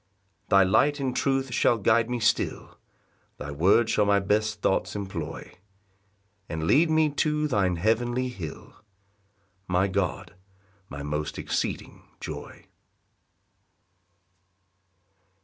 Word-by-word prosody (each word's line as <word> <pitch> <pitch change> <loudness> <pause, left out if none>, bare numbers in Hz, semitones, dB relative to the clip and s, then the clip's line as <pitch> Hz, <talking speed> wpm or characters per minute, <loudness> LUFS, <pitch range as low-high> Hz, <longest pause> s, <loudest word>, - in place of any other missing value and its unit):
6 - - -37
Thy 100 -1 +6
light 145 +10 +2
and 130 -2 -2
truth 135 -2 0
shall 120 -1 +3
guide 110 +3 +2
me 125 0 -2
still, 110 - -1 0.6
Thy 70 - -6
word 95 +10 +3
shall 105 - +2
my 100 -1 +4
best 105 +2 0
thoughts 95 - 0
employ, 90 -6 -6 1.0
And 80 -1 -4
lead 155 - +4
me 155 -1 +3
to 150 +1 0
thine 100 -9 +1
heavenly 120 +7 0
hill, 90 -11 -8 0.9
My 90 +2 +2
God, 95 -3 -2 0.6
my 70 0 -7
most 75 +1 -3
exceeding - - -3 0.2
Joy. - - -8
105 Hz, 115 wpm, -26 LUFS, 90-125 Hz, 1.0 s, Thy